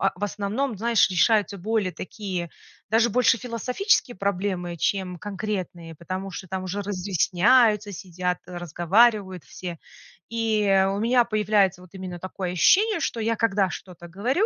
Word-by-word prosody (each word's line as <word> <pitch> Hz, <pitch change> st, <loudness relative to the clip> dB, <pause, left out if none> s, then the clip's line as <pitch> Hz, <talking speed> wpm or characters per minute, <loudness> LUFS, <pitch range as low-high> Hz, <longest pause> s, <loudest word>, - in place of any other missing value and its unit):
в 200 Hz, -, -6 dB
основном, 210 Hz, +5 st, -2 dB
знаешь, 230 Hz, -1 st, +3 dB
решаются 205 Hz, +2 st, +2 dB
более 210 Hz, 0 st, -1 dB
такие, 185 Hz, -3 st, -5 dB, 0.4 s
даже 230 Hz, +2 st, +3 dB
больше 235 Hz, 0 st, +3 dB
философические 250 Hz, -, 0 dB
проблемы, 185 Hz, -3 st, -2 dB
чем 185 Hz, +1 st, -1 dB
конкретные, 190 Hz, -4 st, -5 dB
потому 185 Hz, +4 st, -5 dB
что 185 Hz, -, -8 dB
там 190 Hz, +1 st, -4 dB
уже 195 Hz, +2 st, -3 dB
разъясняются, 205 Hz, +3 st, +2 dB
сидят, 180 Hz, -1 st, -3 dB
разговаривают 180 Hz, +3 st, +1 dB
все. 175 Hz, -2 st, -8 dB, 0.5 s
И 225 Hz, -2 st, 0 dB, 0.3 s
у 195 Hz, +1 st, -2 dB
меня 240 Hz, +2 st, +3 dB
появляется 210 Hz, -4 st, +1 dB
вот 180 Hz, -, -15 dB
именно 185 Hz, -2 st, -7 dB
такое 185 Hz, 0 st, -5 dB
ощущение, 410 Hz, -, +4 dB
что 230 Hz, -, -2 dB
я 230 Hz, +1 st, 0 dB
когда 200 Hz, -4 st, +2 dB
что-то 175 Hz, -2 st, -9 dB
говорю... 245 Hz, -, 0 dB
200 Hz, 135 wpm, -24 LUFS, 180-225 Hz, 0.5 s, ощущение